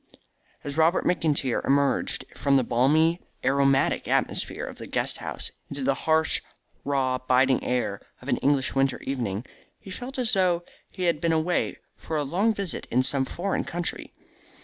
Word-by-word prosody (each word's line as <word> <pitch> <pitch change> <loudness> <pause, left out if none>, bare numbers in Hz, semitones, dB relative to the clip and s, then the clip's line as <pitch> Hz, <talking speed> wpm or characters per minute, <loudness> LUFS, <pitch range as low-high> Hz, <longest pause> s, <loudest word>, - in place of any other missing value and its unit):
As 145 +1 -5
Robert 165 +3 +3
McIntyre 150 -7 +1
emerged 140 -1 +1
from 140 -1 +3
the 130 - +3
balmy 155 +9 +3 0.2
aromatic 135 0 +2
atmosphere - - 0
of - - -9
the - - -7
great - - -1
house, - - -5 0.2
into 140 -1 -5
the 135 +1 +3
harsh, 160 +3 +2 0.4
raw, 130 -2 0
biting 130 +1 +3
air 125 -5 -1 0.2
of - - -13
an - - +1
English 140 -2 +1
winter 135 -1 +1
evening, 120 -5 -3 0.3
he 195 - -11
felt 250 +7 -6
as 250 -1 +2
though 180 -3 +2 0.3
he 185 - -6
had 170 -3 +1
been 170 -1 +2
away 160 +2 0 0.2
for 160 - -4
a 150 - 0
long 185 +11 +1
visit 200 -5 -4
in 125 +2 +2
some 135 0 +1
foreign 185 +8 -2
country. 175 0 -3
140 Hz, 165 wpm, -26 LUFS, 130-170 Hz, 0.4 s, Robert